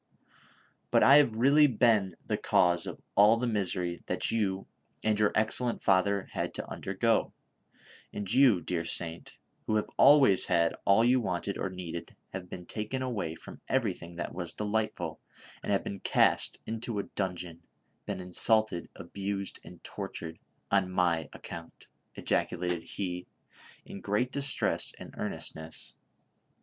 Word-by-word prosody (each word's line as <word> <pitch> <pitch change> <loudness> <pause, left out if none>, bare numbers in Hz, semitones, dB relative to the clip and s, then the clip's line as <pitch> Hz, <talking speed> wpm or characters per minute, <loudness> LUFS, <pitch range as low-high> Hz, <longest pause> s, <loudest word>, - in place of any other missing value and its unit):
" - - -33
But - - +4
I 140 +2 +9
have 140 -7 +4
really 140 +6 +6
been 110 -7 +3
the - - 0
cause 85 -1 +2
of - - -6
all 105 +3 +6
the 125 - -1
misery 90 -6 -1
that - - -1
you 95 -4 0 0.4
and 105 -1 +1
your 105 -1 +3
excellent 115 +3 0
father 100 +1 +2
had - - -3
to - - -5
undergo; 110 +4 0 0.8
and 100 0 -3
you, 125 -8 +5
dear 85 -2 -2
saint, 85 0 -5 0.3
who 110 - +1
have 105 - +1
always 135 -9 +6
had 85 -2 +2
all 100 +4 +5
you 125 +1 +4
wanted 95 -1 -2
or 95 - -1
needed 90 -2 -7 0.2
have 90 -1 -6
been 90 - -8
taken 110 +7 -3
away 100 -11 -3
from - - -12
everything 95 -9 -1
that 85 - -4
was 85 -2 -5
delightful, 105 +1 -2 0.4
and - - -3
have - - +2
been 100 - -5
cast - - +2
into 115 0 -4
a 100 - 0
dungeon, 90 -3 -4 0.5
been - - -3
insulted, 90 +1 +1
abused 100 +2 -4
and - - -13
tortured 80 0 -6 0.3
on 100 -2 +3
my 85 -3 +1
account! 85 0 -10 0.2
" - - -46
ejaculated 90 0 -1
lie, 90 -2 -3 0.6
in 100 - -9
great 105 +5 0
dis 140 0 -2
tress - - 0
and - - -10
earnestness. 80 +1 -6
100 Hz, 150 wpm, -30 LUFS, 90-110 Hz, 0.8 s, I